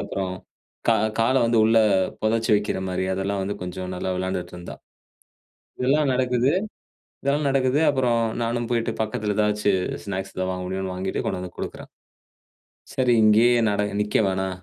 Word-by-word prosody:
அப்புறம் 95 -2 -3 0.6
கா 115 - +6 0.2
கால 115 +3 +3
வந்து 115 0 +2
உள்ள 115 +1 +4 0.4
பொதச்சு 115 +1 +1
வைக்கிறமாரி. 95 -2 -1
அதெல்லாம் 95 +1 -2
வந்து 100 +2 -3
கொஞ்ச 90 +1 -5
நல்லா 90 +1 -3
வெளாண்டுட்டு 95 0 -3
இருந்தா. 90 - -8 1.0
இதெல்லா 135 +4 +2
நடக்குது 125 0 +2 0.7
இதெல்லா 140 +2 +1
நடக்குது. 135 +1 +2
அப்புறம் 125 -4 +2 0.2
நானும் 120 0 -1
போயிட்டு 115 -1 0
பக்கத்துல 110 -2 -2
எதாச்சு 105 -1 +2 0.3
ஸ்நாக்ஸ் 95 -1 -5
எதாவது 95 0 -1
வாங்க 90 0 -4
முடியும்னு 95 0 -3
வாங்கிட்டு 95 +1 -2
கொண்டு 95 - -2
வந்து 90 -1 -8
குடுக்கறேன். - - -7 1.1
சரி 125 -2 +2
இங்கயே 110 +3 +5 0.2
நட 105 0 +1 0.2
நிக்க 105 0 0
வேணா. 95 0 -1
105 Hz, 145 wpm, -24 LUFS, 95-120 Hz, 1.1 s, கா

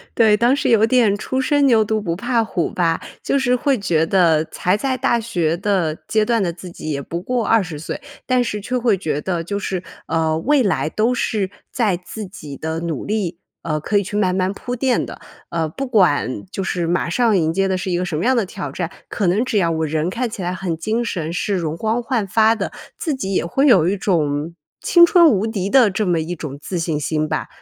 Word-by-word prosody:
对， 220 -3 +5
当 240 +5 +3
时 280 - 0
有 220 -2 +5
点 230 -4 +3
初 260 +5 -2
生 285 +2 +2
牛 225 -4 +4
犊 215 +1 -1
不 170 -5 -2
怕 235 +4 0
虎 180 -6 -2
吧， 165 -2 +1 0.2
就 275 - +1
是 250 -2 +2
会 270 +1 +1
觉 170 -6 +1
得 165 -4 +3
才 180 +3 0
在 260 +5 -1
大 235 - +1
学 175 -8 -1
的 185 -5 0
阶 215 -1 +2
段 230 -1 +1
的， 175 - 0
自 175 +2 -10
己 155 -2 -6
也 140 -1 -2
不 170 +5 -5
过 245 +3 -1
20 180 -9 +1
岁， 160 - -6 0.2
但 255 -1 +2
是 210 -3 -3
却 250 +5 -2
会 230 -5 +2
觉 155 -5 -2
得 175 -2 -2
就 200 +4 -3
是， 185 -2 -3 0.2
呃， 160 -1 +1
未 280 - +3
来 155 -8 0
都 220 +8 +1
是 210 -5 -1 0.2
在 215 -8 +1
自 205 +4 -8
己 155 -7 -9
的 160 +1 -3
努 165 -4 -3
力 190 -5 -2 0.2
呃， 155 -2 -1
可 205 +7 0
以 200 - +2
去 205 +2 -4
慢 185 -3 +1
慢 185 0 +1
铺 245 +4 -5
垫 255 0 +1
的。 - - -10 0.3
呃， 165 -2 -1
不 270 - -5
管 180 - +2
就 195 - -3
是 180 -2 -1
马 175 0 0
上 220 +2 +2
迎 160 -1 +1
接 195 +2 +1
的 190 -1 0
是 185 - -4
一 175 - +1
个 180 - -1
什 165 -4 -3
么 170 - -1
样 260 +1 +3
的 230 -4 +1
挑 195 +1 -6
战， 175 -1 -4 0.2
可 200 - -1
能 205 +8 +2
只 230 - 0
要 170 -4 +2
我 160 -1 0
人 155 +2 -1
看 235 +5 -2
起 210 - -7
来 180 0 -2
很 185 -2 -3
精 220 +8 -1
神， 165 -6 -3
是 200 +3 -1
容 160 -3 -2
光 225 +5 -1
焕 235 -5 -1
发 220 +3 +4
的， - - -3 0.3
自 310 -5 -2
己 195 -7 -3
也 185 - +1
会 270 +11 +1
有 185 - +5
一 195 - +1
种 160 -4 0 0.3
青 345 -1 +6
春 340 -1 +6
无 215 -8 +2
敌 200 -4 -2
的 250 -2 +5
这 200 +2 -1
么 175 -2 +1
一 165 +3 -3
种 145 -4 -7
自 180 - -4
信 160 -2 -1
心 155 +1 -1
吧， - - -2
195 Hz, 255 characters per minute, -20 LUFS, 170-230 Hz, 0.3 s, 青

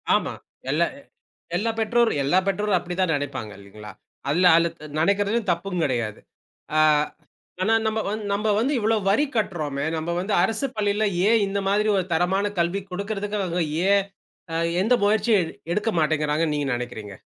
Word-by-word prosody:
ஆமா. - - -1 0.4
எல்லா - - +3
எ - - -15 0.5
எல்லா 225 +5 0
பெற்றோரும் 225 -7 +2
எல்லா 145 +7 +2
பெற்றோரும் 200 0 +1
அப்படித்தான் 180 0 -1
நினைப்பாங்க 140 -7 -4
இல்லீங்களா? 105 +1 -11 0.4
அதுல 180 +5 +4
அல்லது 170 0 +3 0.3
நினைக்கிறது 200 +5 +2
தப்பும் 175 +1 -2
கிடையாது. 120 -5 -1 0.6
ஆ, - - +5 0.8
ஆனா 225 +4 +2
நம்ம 220 0 0
வந்து 215 0 -4
நம்ம 210 +1 +1
வந்து 270 +6 +1
இவ்ளோ 220 0 +2
வரி 280 +9 +3
கட்டுறோமே, 155 -9 -1
நம்ம 160 +2 -4
வந்து 195 +3 -2
அரசுப் 245 +6 -1
பள்ளியில 210 0 +1 0.2
ஏன் 225 -2 +4
இந்த 200 +1 -1
மாதிரி 210 +2 +2
ஒரு 185 - 0
தரமான 190 +5 +1
கல்வி 175 +4 0
கொடுக்குறதுக்கு 205 +2 -3
அவங்க 180 -2 -1 0.3
ஏன் 200 0 +4 0.5
அ - - -1 0.3
எந்த 240 +4 +3
முயற்சியும் 205 -4 +2 0.2
எடுக்க 210 +4 0
மாட்டேங்கிறாங்கன்னு 150 0 +1
நீங்க 145 -1 -1
நினைக்கிறீங்க? 110 -5 -7
190 Hz, 155 wpm, -24 LUFS, 155-210 Hz, 0.8 s, ஆ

